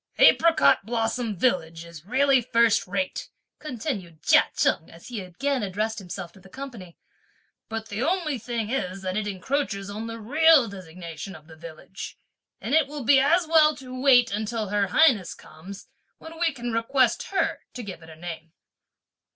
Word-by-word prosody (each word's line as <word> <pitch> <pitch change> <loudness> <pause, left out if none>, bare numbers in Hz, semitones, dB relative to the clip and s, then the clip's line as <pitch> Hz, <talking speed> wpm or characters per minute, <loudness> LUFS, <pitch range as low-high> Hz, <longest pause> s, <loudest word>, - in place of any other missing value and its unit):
"'Apricot 330 -9 +5
blossom 225 0 -2
village' 165 -7 0
is 170 0 -13
really 265 +2 +3
first 230 -4 +2
rate," 185 0 -3 0.3
continued 215 - -5
Chia - - +5
Cheng 160 - +1
as 165 +7 -14
he 230 -5 -5
again 255 +9 -2
addressed 215 +3 -2
himself 175 -2 -7
to 190 - -18
the 190 +1 -17
company; 230 -8 -9 0.7
"but 225 0 -5
the 205 +3 -4
only 315 -3 0
thing 230 -1 -4
is 195 -7 -3
that 185 0 -3
it 215 0 -1
encroaches 200 0 -3
on 220 +2 -5
the 230 0 -6
real 295 +3 +5
designation 180 -2 -9
of 155 - -14
the 160 0 -14
village; 165 +4 -10 0.4
and 240 - -4
it 315 -2 +4
will 290 -1 -6
be 270 +3 +5
as 330 +6 +3
well 310 -1 +5
to 260 -2 -10
wait 250 -4 +5
(until 215 0 -3
her 205 -1 +1
highness 230 - +3
comes), 185 +6 -12 0.3
when 320 0 -11
we 340 -2 +2
can 240 -4 -5
request 240 +1 +1
her 390 - -1 0.2
to 250 - -6
give 190 -5 -8
it 160 - -14
a 160 - -11
name." 165 -1 -8
225 Hz, 170 wpm, -25 LUFS, 185-270 Hz, 0.7 s, Apricot